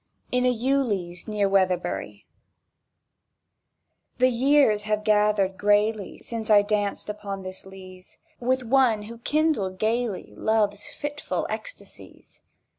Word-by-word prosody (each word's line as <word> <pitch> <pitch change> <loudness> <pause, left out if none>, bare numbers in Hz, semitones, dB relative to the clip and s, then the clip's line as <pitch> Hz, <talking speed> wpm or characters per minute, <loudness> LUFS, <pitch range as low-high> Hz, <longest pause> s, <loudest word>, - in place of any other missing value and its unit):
IN 250 0 +2
A - - +4
EWELEAZE 225 -9 -1
NEAR 210 -2 +1
WEATHERBURY 180 - 0 1.9
THE 255 +1 +4
years 255 -3 +3
have 215 0 -1
gathered 210 -2 +2
grayly 210 0 +1
Since 225 -2 -6
I 205 -1 +6
danced 205 -1 -1
upon 200 -2 -6
this 185 0 -9
leaze 185 -1 -13 0.2
With 255 +1 0
one 240 -3 +3
who 230 +2 -10
kindled 275 -10 0
gaily 225 -1 -1
Love's 210 -2 0
fitful 290 0 -4
ecstasies! - - -10
210 Hz, 115 wpm, -25 LUFS, 195-245 Hz, 1.9 s, I